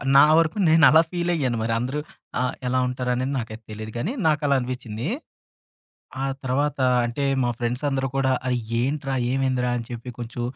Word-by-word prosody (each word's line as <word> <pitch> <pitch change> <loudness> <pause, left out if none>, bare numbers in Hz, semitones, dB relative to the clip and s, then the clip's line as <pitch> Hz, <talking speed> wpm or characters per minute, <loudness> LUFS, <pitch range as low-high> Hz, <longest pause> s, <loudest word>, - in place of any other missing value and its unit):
నా 140 - +9
వరకు 165 +5 +2
నేనలా 160 0 +7
ఫీలయ్యాను 170 -9 0
మరి 115 0 0
అందరూ 130 +5 -2 0.4
ఆహ్, 125 0 0
ఎలా 130 +1 +1
ఉంటారనేది 125 +1 -1
నాకైతే 110 -1 -7
తెలీదు 110 +1 -6
కానీ, 170 - -2
నాకలా 145 -2 +2
అనిపిచ్చింది. 125 -1 -4 1.2
ఆ - - +1 0.2
తర్వాత 140 +3 0 0.3
అంటే, 130 +4 -2 0.2
మా 120 - +1
ఫ్రెండ్స్ 120 +3 -2
అందరూ 135 -1 0
కూడా, 135 -1 +2 0.2
"ఆ! - - +1 0.3
ఏంట్రా? 135 +1 -1 0.2
ఏమైందిరా?" 130 -2 +1
అని 115 - -6
చెప్పి 120 +1 -6
కొంచెం 120 0 -5
130 Hz, 155 wpm, -24 LUFS, 120-145 Hz, 1.2 s, నా